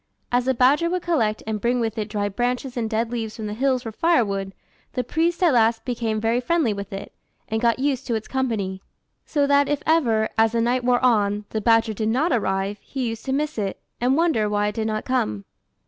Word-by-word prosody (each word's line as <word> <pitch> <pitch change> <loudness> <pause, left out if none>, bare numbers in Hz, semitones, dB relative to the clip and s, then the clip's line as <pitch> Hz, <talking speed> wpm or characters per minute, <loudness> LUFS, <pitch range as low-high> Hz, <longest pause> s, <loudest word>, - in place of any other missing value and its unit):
As 245 0 +2
the 260 0 +1
badger 280 +8 +4
would 360 0 -2
collect 225 -11 0
and 215 -1 -3
bring 245 +1 +1
with 225 -2 -1
it 215 -1 -3
dried 205 -2 -2
branches 250 +1 -1
and 230 -3 -2
dead 225 +1 -1
leaves 225 -3 -3
from 220 -2 -6
the 210 - -3
hills 255 +2 +1
for 225 - -5
firewood, 205 - +1 0.4
the 250 - -1
priest 335 +7 0
at 335 -5 +5
last 225 -1 +3
became 230 -3 -1
very 225 +3 +1
friendly 290 -4 +1
with 200 -1 -7
it, 195 0 -7 0.3
and 220 0 -2
got 235 -1 +3
used 270 -1 -1
to 235 - 0
its 220 - -4
company; 215 -8 -2 0.5
so 290 -2 +1
that 285 0 +3
if 290 0 -1
ever, 235 -10 +3
as 225 0 +4
the 230 - +1
night 245 +2 +1
wore 250 +1 +2
on, 210 -3 +2
the 220 - -2
badger 225 0 +3
did 215 +1 -1
not 270 +9 +1
arrive, 195 -2 -1
he 260 -4 -3
used 225 -1 -7
to 265 - -2
miss 295 -1 -1
it, 195 -2 -3 0.2
and 255 +3 +3
wonder 315 -11 +2
why 205 0 +1
it - - -6
did 220 0 -2
not 215 0 -2
come. 105 - -1
230 Hz, 225 wpm, -23 LUFS, 215-260 Hz, 0.5 s, at